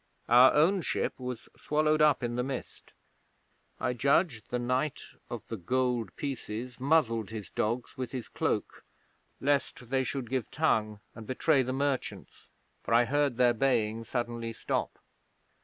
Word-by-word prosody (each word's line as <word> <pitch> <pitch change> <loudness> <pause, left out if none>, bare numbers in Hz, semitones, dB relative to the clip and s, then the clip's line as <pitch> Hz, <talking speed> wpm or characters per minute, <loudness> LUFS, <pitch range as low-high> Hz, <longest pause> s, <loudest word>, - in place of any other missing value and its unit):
Our 125 +2 +8
own 175 +6 +4
ship - - -2
was 125 -2 -6
swallowed 155 +1 +1
up 150 -3 +4
in 120 0 -2
the 125 - 0
mist. 130 0 -6 0.9
I 125 - 0
judge 140 - +2
the 125 - -2
Knight 125 +4 -1 0.3
of - - -5
the 115 - -4
Gold 120 +1 -1
Pieces 125 -3 -5
muzzled 125 - +2
his 110 -2 -7
dogs 120 +5 -2
with 130 -2 -4
his 130 -3 -5
cloak, - - -2 0.6
lest 135 -3 -1
they 135 -1 +2
should 130 -1 -4
give 130 -4 -1
tongue 110 -9 0
and 110 -1 -10
betray 135 +2 +3
the 130 0 -2
merchants, 135 0 -3 0.3
for 115 - +1
I 120 +1 +5
heard 140 -2 +1
their 125 -1 +5
baying 115 -3 +1
suddenly 120 -1 -3
stop. - - -2
125 Hz, 150 wpm, -30 LUFS, 115-140 Hz, 0.9 s, Our